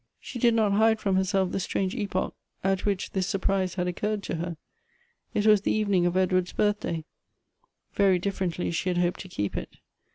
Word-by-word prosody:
She 245 Hz, -, -7 dB
did 235 Hz, -1 st, +4 dB
not 215 Hz, -3 st, +3 dB
hide 220 Hz, +2 st, +4 dB
from 195 Hz, -3 st, +1 dB
herself 190 Hz, 0 st, +1 dB
the -, -, -1 dB
strange 190 Hz, 0 st, -1 dB
epoch 200 Hz, -5 st, -2 dB, 0.3 s
at 195 Hz, +1 st, +1 dB
which 200 Hz, -2 st, -1 dB
this 190 Hz, -1 st, -1 dB
surprise 195 Hz, -2 st, 0 dB
had 180 Hz, -1 st, -1 dB
occurred 205 Hz, +3 st, -2 dB
to 170 Hz, -, -3 dB
her. 170 Hz, 0 st, -4 dB, 0.8 s
It 210 Hz, -, +1 dB
was 210 Hz, -2 st, +6 dB
the -, -, 0 dB
eve 215 Hz, -1 st, 0 dB
ning 180 Hz, -3 st, +3 dB
of 175 Hz, +1 st, 0 dB
Edward's 185 Hz, -1 st, +1 dB
birthday. 205 Hz, -6 st, 0 dB, 0.9 s
Very 195 Hz, -2 st, +4 dB
differently 180 Hz, -2 st, -2 dB
she 170 Hz, +2 st, -1 dB
had 180 Hz, -, 0 dB
hoped 175 Hz, 0 st, +1 dB
to 185 Hz, -, -8 dB
keep 105 Hz, -, -3 dB
it. -, -, -6 dB
190 Hz, 195 wpm, -27 LUFS, 180-205 Hz, 0.9 s, was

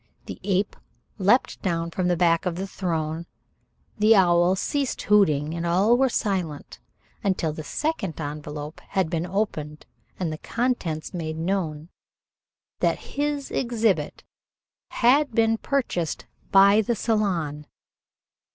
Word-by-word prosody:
The -, -, -8 dB
ape 195 Hz, 0 st, 0 dB, 0.4 s
leaped 205 Hz, +7 st, +2 dB
down 170 Hz, -3 st, -1 dB
from 180 Hz, +1 st, -1 dB
the 175 Hz, -1 st, +2 dB
back 170 Hz, 0 st, +2 dB
of 175 Hz, -, -1 dB
the 190 Hz, +2 st, -3 dB
throne, 165 Hz, -3 st, -3 dB, 0.7 s
the 215 Hz, +2 st, +6 dB
owl 175 Hz, -1 st, +4 dB
ceased 275 Hz, +7 st, -2 dB
hooting, 155 Hz, -8 st, +3 dB
and 170 Hz, 0 st, -3 dB
all 190 Hz, +7 st, +3 dB
were 265 Hz, +1 st, +3 dB
silent 185 Hz, -10 st, -2 dB, 0.4 s
until 185 Hz, -6 st, 0 dB
the 155 Hz, -, -6 dB
second 200 Hz, -, -3 dB
envelope 150 Hz, 0 st, -6 dB
had 190 Hz, -5 st, 0 dB
been 170 Hz, 0 st, -1 dB
opened 160 Hz, -6 st, -3 dB, 0.3 s
and 170 Hz, -4 st, -1 dB
the 155 Hz, -, -7 dB
contents 230 Hz, -12 st, -2 dB
made 160 Hz, -3 st, -4 dB
known 165 Hz, -3 st, -2 dB, 0.9 s
that -, -, -1 dB
his 290 Hz, -1 st, -1 dB
exhibit 220 Hz, -, 0 dB, 0.7 s
had 265 Hz, +2 st, +3 dB
been 225 Hz, -1 st, +3 dB
purchased 210 Hz, -, -2 dB, 0.3 s
by 200 Hz, +2 st, +7 dB
the 235 Hz, +2 st, -1 dB
Salon. 175 Hz, -10 st, -1 dB
185 Hz, 125 wpm, -25 LUFS, 160-215 Hz, 0.9 s, by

